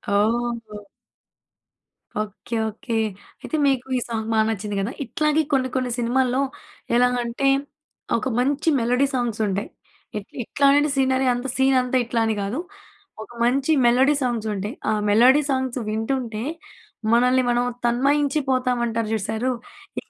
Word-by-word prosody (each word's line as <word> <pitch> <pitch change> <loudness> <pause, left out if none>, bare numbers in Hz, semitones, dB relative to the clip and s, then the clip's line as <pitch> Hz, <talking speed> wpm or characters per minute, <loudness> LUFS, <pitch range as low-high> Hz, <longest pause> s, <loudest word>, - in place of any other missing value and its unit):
ఓహ్! 220 -1 -1 1.3
Okay. 215 +3 -6
Okay. 225 +2 -4 0.4
అయితే, - - -4
మీకు 265 -1 0
ఈ - - +1
సాంగ్ 220 -1 -3
బా 220 - +3
నచ్చింది 205 -1 -3
గదా! 200 +4 -2
ఇట్లాగే 305 +5 +1
కొన్ని 260 -1 +2
కొన్ని 255 -1 0
సినిమాల్లో 255 +2 +1 0.5
ఎలాగంటే, 245 +1 +1 0.7
ఒక 230 - -3
మంచి 280 +5 +1
మెలోడీ 250 +4 +2
సాంగ్సుంటాయి. 220 -5 -1 0.5
ఇట్ 205 - -7
ఇట్లాంటి 285 +4 +3
సీనరీ, 265 0 +2
అంత 245 +2 -3
సీనంతా 260 -1 +3
ఇట్లా 235 0 -1
అని 220 -1 0
గాదు. 205 +9 -2 0.6
ఒక - - -15
మంచి 265 +5 +2
మెలోడీ 260 +4 +5
సాంగ్సుంటాయి. 220 -2 -2
ఆ - - +3 0.2
మెలోడీ 250 +7 +6
సాంగ్స్ 260 -1 -1
వింటుంటే, 225 0 -2 0.7
మనల్ని 250 +2 +4
మనం 240 0 +2 0.2
తన్మయించిపోతామంటారు 255 -3 +1
చూశారూ? 220 +4 -1 0.5
ఇక - - -28
245 Hz, 120 wpm, -23 LUFS, 225-265 Hz, 1.3 s, మెలోడీ